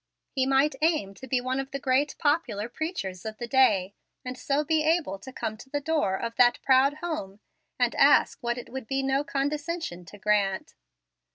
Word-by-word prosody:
He 265 -1 0
might 270 +2 +3
aim 310 - +1
to 260 - -11
be 255 0 +1
one 255 +1 -1
of 270 0 -4
the 275 - -4
great 275 +1 +1
popular 290 -9 0
preachers 240 - -4
of 220 0 -6
the 240 - -4
day; 210 -7 +3 0.3
and 250 0 -4
so 280 +3 0
be 315 +1 +1
able 310 - +1
to 260 - -10
come 220 -4 -4
to 255 +4 -13
the 290 - -1
door 285 -10 0
of 230 +3 -4
that 245 -1 +5
proud 270 +2 +4
home 210 - -4 0.4
and - - +2
ask - - +4
what 240 0 -1
it 245 - -8
would 265 -3 -6
be 270 +2 -1
no 270 +1 +1
condescension 290 - -3
to 205 - -12
grant. 200 -1 0
265 Hz, 195 wpm, -27 LUFS, 215-290 Hz, 0.4 s, that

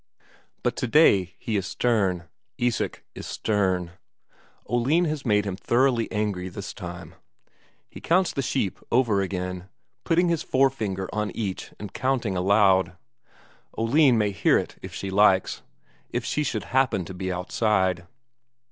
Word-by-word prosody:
But - - 0
today 110 - +3
he 110 -3 -2
is 95 -1 -2
stern; 95 -8 0 0.3
Isak 120 -1 -1
is - - -8
stern. 95 -5 0 0.8
Oline 135 +9 +2
has 150 -4 -3
made 105 -1 +3
him 100 -2 -3
thoroughly 120 +3 +1
angry 105 -4 -2
this 100 +3 -7
time. 85 -2 -8 0.7
He - - -12
counts 180 +2 +2
the 140 - -1
sheep 100 -6 -1
over 115 -5 +3
again, 90 -1 -4 0.3
putting 175 +1 +2
his 170 -2 0
forefinger 110 -8 0
on 105 -1 -1
each 100 -5 -4
and 105 -2 -8
counting 125 -7 -1
aloud 95 -1 +3 0.8
Oline 125 +3 +4
may 105 -2 +1
hear 95 - +3
it - - -4
if - - -8
she 95 - -5
likes, 95 -1 +3 0.5
if - - -3
she 150 - 0
should 110 -8 -2
happen 125 -9 +2
to 95 - -8
be 95 0 -4
outside. 90 -1 0
105 Hz, 140 wpm, -25 LUFS, 95-125 Hz, 0.8 s, Oline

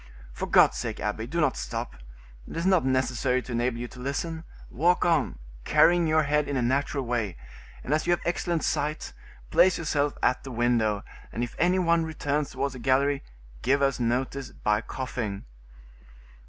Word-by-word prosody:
For - - -4
God's - - +5
sake, - - -4
abbe, 105 +2 -3
do 170 +7 -2
not 150 -5 +2
stop,—it - - -8
is 165 - -1
not 185 -3 +4
necessary 130 -1 +1
to - - -9
enable 120 0 0
you 120 +1 -4
to 125 - -13
listen; 160 +5 -3 0.3
walk 175 +7 +2
on, 165 - +1 0.3
carrying 175 - +4
your 155 0 +3
head 150 0 +1
in 140 - -1
a - - +1
natural 135 +2 0
way, 115 - -2 0.5
and 140 - -1
as 155 - 0
you - - +3
have 175 - -1
excellent 170 -1 -1
sight, 150 +2 -2 0.4
place 185 0 +5
yourself 145 -3 0
at 125 - +2
the 135 - -7
window, 115 -4 +1 0.3
and 120 - -2
if 120 - -4
any 180 +2 +3
one 170 -2 +3
returns 150 -2 -2
towards 140 0 -2
the 130 - -8
gallery, 135 +3 +2 0.4
give 140 +3 +2
us 135 -2 +1
notice 125 +3 -1
by 105 0 0
coughing." 115 -4 -4
135 Hz, 175 wpm, -27 LUFS, 120-155 Hz, 0.5 s, God's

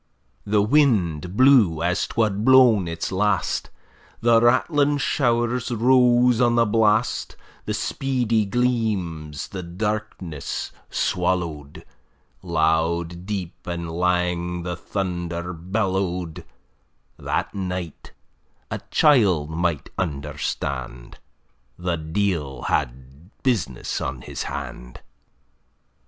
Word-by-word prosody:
] 65 +1 -42
The 105 0 +3
wind 100 - +2
blew 115 - +5
as 90 +2 0
'twad 105 -2 0
blawn 125 -7 +6
its 85 +2 -4
last; 95 -1 0 0.5
The 115 -1 +4
rattling 145 +4 +3
show'rs 120 -3 0
rose 125 0 +4
on 120 -1 +3
the 115 0 +4
blast; 110 +1 +1 0.3
The - - -2
speedy 120 -5 0
gleams 100 - -1
the 95 - -5
darkness 90 -4 -4 0.2
swallow'd; 85 -5 -2 0.6
Loud, 85 +1 0
deep, 95 -5 -3
and 85 -1 -4
lang 90 0 0
the 90 0 -3
thunder 90 -2 -4
bellowed: 90 -1 -2 0.7
That - - -2
night, 90 -4 -5 0.6
a - - -2
child 100 - +4
might 85 -2 -2
understand, 70 -6 -4 0.6
The 90 -1 -2
deil 80 -6 -2
had 65 +7 -3
business 90 - -1
on 65 -1 -4
his - - -6
hand. - - -7
90 Hz, 95 wpm, -23 LUFS, 85-115 Hz, 0.7 s, blawn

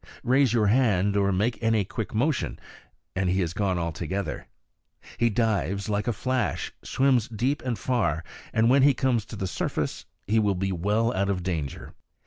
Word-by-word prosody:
Raise 130 0 +3
your 115 -3 +3
hand, 100 -4 +3
or 100 -1 +2
make 110 +6 0
any 115 -3 +2
quick 110 +2 -5
motion, 130 +5 0 0.6
and 95 -1 +1
he 95 +2 +1
is 85 -1 -3
gone 95 -2 0
altogether. 85 +2 -3 0.7
He 120 - +4
dives 100 -4 0
like 105 +1 -1
a - - +3
flash, 125 +2 -2
swims 130 -4 +2
deep 120 +6 -1
and 125 -3 -2
far, 105 -11 0 0.3
and 110 +1 +3
when 135 +3 +5
he 140 0 +5
comes 120 -5 +1
to 110 - -9
the 95 - -3
surface 90 - -3 0.2
will 105 -2 +2
be 95 +1 -1
well 105 +6 +1
out 100 +1 0
of 95 -3 -1
danger. 80 -7 -4
105 Hz, 170 wpm, -26 LUFS, 95-120 Hz, 0.7 s, when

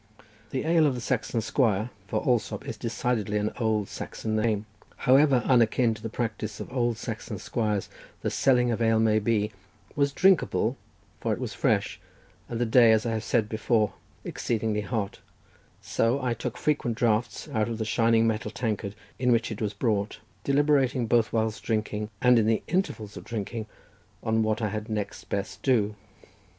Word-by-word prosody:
The 130 - -2
ale 165 -1 +4
of 135 - 0
the - - -4
Saxon 120 -2 -1
squire, 110 -1 +1 0.2
for 110 +2 -1
Allsopp 120 -3 0
is - - -4
decidedly 115 -3 -1
an 105 +1 0
old 110 -3 +1
Saxon 110 0 -4
name, 110 -1 +1 0.3
however 135 -1 +4
unakin 120 -2 +4
to 110 - -10
the 115 - -4
practice 110 -2 -3
of - - -7
old 120 -3 +1
Saxon - - -5
squires 105 -4 -1 0.4
the - - 0
selling 125 -2 +3
of 115 - -2
ale 115 -1 +3
may 110 -1 +3
be, 105 -1 +1 0.4
was 140 -1 +2
drinkable, 190 +3 +3 0.4
for - - 0
it - - -4
was - - -4
fresh, - - 0 0.5
and 115 - -3
the 120 - +2
day, 115 0 +6
as 110 +1 +3
I 115 - 0
have 110 -1 -2
said 110 -2 +1
before, 110 -1 +1 0.3
exceedingly 110 -2 -1
hot; 105 -2 -3 0.6
so 115 +4 +1
I 125 -3 0
took 115 - -5
frequent 130 -7 0
draughts 120 +2 0
out 110 -5 0
of 115 - -3
the 110 - -2
shining 115 0 +3
metal 110 -1 0
tankard 105 -3 -3 0.2
in 125 -1 +3
which 115 -1 +2
it 110 - -6
was 105 -1 -2
brought, 105 -2 0 0.3
deliberating 140 -3 +2
both 115 +1 +2
whilst 110 -1 0
drinking, 105 -1 -2
and 125 -1 +6
in 110 - +2
the 110 -1 +2
intervals 115 - -2
of - - -8
drinking, 110 0 -4 0.6
on 110 0 +2
what 110 +1 0
I 110 - +1
had 110 +1 -5
next 105 -2 -4
best 100 -1 -4
do. 110 -6 +2
115 Hz, 175 wpm, -27 LUFS, 110-125 Hz, 0.6 s, day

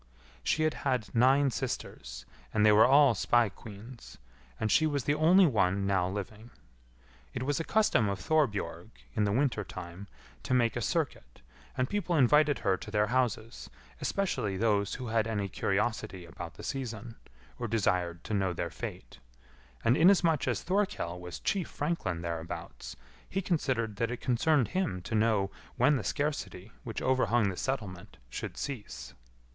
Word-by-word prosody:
She 155 - +1
had 155 - +2
had 125 -6 -1
nine 135 +3 +4
sisters, - - -5 0.3
and 110 -1 +2
they 105 - +7
were 105 +2 +7
all 140 -1 +6
spae 120 +2 +2
queens, 110 +4 -12 0.4
and 110 - 0
she 155 - +4
was 145 -3 -1
the 145 - +1
only 170 +5 +5
one 100 - +2
now 95 -2 +1
living. 105 +4 -6 0.9
It 125 - -2
was 145 +1 0
a - - -1
custom 160 - +2
of 100 - -2
Thorbjorg, 105 - 0 0.3
in 105 - +2
the 100 - +1
winter 125 -2 +1
time, 90 +1 -9 0.3
to 130 - 0
make 120 -3 +2
a 120 - -2
circuit, 60 - -3 0.4
and 130 -1 +1
people 185 -2 -1
invited 150 +1 +4
her 95 -2 +3
to - - -9
their 105 -1 +2
houses, 115 -3 -1 0.3
especially 110 - -1
those 100 -1 +1
who 130 - -6
had 110 -1 +1
any 105 -3 -1
curiosity 100 -1 -2
about 85 0 -9
the - - -11
season, 120 -4 -5 0.4
or 120 - -2
desired 90 -6 0
to - - -5
know 95 -3 +1
their - - -3
fate; - - -8 0.7
and 120 - +5
inasmuch 170 -4 +4
as 120 -6 -1
Thorkell 185 - -1
was 90 -1 -7
chief 190 -5 -1
franklin 145 - -2
thereabouts, 85 0 -6 0.3
he 195 - -1
considered 130 - -1
that 115 +1 0
it 125 - -3
concerned 130 +1 +2
him 175 - -2
to - - -6
know 105 -3 +2 0.2
when 145 -1 +4
the 115 - -4
scarcity 125 -6 -3
which 115 - -5
overhung 120 -4 +2
the 95 - -4
settlement 100 -8 -4
should - - -6
cease. 65 - -6
115 Hz, 160 wpm, -30 LUFS, 95-140 Hz, 0.9 s, they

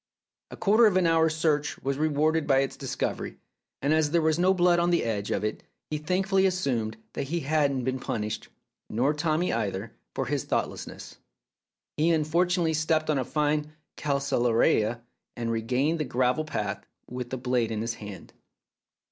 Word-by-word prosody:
A - - -9
quarter 220 +3 +5
of 190 -3 +2
an 185 - +3
hour's 160 -1 +3
search 150 -2 +1
was 140 +1 -1
rewarded 155 +1 +1
by 135 -2 +4
its 135 - -2
discovery, - - -3 0.5
and 145 +2 +3
as 155 -1 +3
there 170 +2 +2
was 160 +1 +2
no 185 +2 +4
blood 175 -2 +4
on 170 0 +2
the 175 - +2
edge 105 -3 -2
of 100 - -1
it 110 - -2 0.3
he 150 - -1
thankfully 190 +4 +2
assumed 125 -12 -1 0.2
that - - -3
he 170 +3 -1
had 150 0 +2
not 130 -2 -2
been 130 +1 -1
punished 105 -3 -3 0.4
(nor 130 +7 +1
Tommy 155 +3 0
either) 105 -1 -3 0.2
for 135 - -1
his 140 +1 -1
thoughtlessness. - - -4 0.8
He 160 +3 +3
unfortunately 170 +2 +2
stepped 155 0 +1
on 145 - +1
a - - 0
fine 150 +2 0 0.2
calceolaria, 120 -5 +1 0.4
and 115 -1 -2
regained 125 +8 0
the - - +1
gravel 130 +3 +1
path 105 -8 -3 0.2
with 125 0 -5
the 130 - -3
blade 125 -2 0
in 110 -1 -2
his 115 +1 -2
hand. 105 -3 -10
145 Hz, 175 wpm, -27 LUFS, 120-160 Hz, 0.8 s, quarter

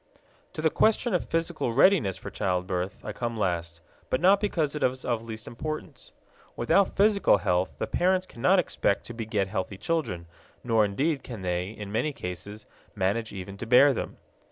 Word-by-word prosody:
To 155 - -5
the 160 - +3
question 225 +1 +2
of 180 - -1
physical 165 -7 -1
readiness 135 - +4
for - - -8
childbirth 90 0 -1
I - - -4
come 115 +1 -3
last, 85 -4 -2 0.3
but 130 - +1
not 195 +3 +5
because 165 -8 0
it 150 - -4
is 130 +1 0
of 120 -2 0
least 110 -1 -8
importance. 155 +6 -6 0.4
Without 185 +11 +2
physical 200 - +4
health 90 -1 0
the - - -1
parents 185 +1 +1
cannot 180 +5 +2
expect 160 - 0
to 120 - -8
beget 110 -4 -1
healthy 95 +1 -3
children, 110 - -2 0.4
nor 115 -3 +3
indeed 135 +9 0
can 115 -6 -8
they, 90 +1 -1
in 105 -2 -8
many 145 +8 0
cases, 100 +1 -7 0.3
manage 105 +3 0
even 95 0 -7
to 115 - -5
bear 135 +4 +7
them. - - -5
115 Hz, 175 wpm, -27 LUFS, 95-155 Hz, 0.4 s, bear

